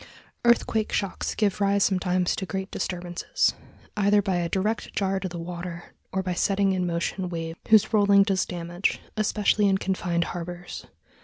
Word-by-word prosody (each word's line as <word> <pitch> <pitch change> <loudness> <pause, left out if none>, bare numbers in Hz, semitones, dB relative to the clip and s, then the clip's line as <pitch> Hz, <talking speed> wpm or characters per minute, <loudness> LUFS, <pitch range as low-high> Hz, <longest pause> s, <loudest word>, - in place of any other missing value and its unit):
Earthquake 230 -2 +2
shocks 195 -2 -2
give 205 -1 0
rise 200 0 +3
sometimes 185 -2 +1
to 190 - -4
great 190 +3 -4
disturbances, 175 -1 -1 0.4
either 205 0 +4
by 190 -3 0
a 170 -1 -1
direct 210 +5 -1
jar 195 -1 0
to 190 -1 -4
the 175 - -7
water, 175 0 -7 0.2
or 190 0 -1
by 180 -1 -1
setting 195 +2 +2
in 180 -1 0
motion 175 +2 -2
waves 165 -1 -5
whose 220 0 +5
rolling 200 -2 +6
does 195 -2 +1
damage, 175 +1 -2 0.2
especially 210 -1 +2
in 190 - +3
confined 180 -3 -1
harbors. 175 +1 -7
190 Hz, 160 wpm, -26 LUFS, 175-200 Hz, 0.4 s, rolling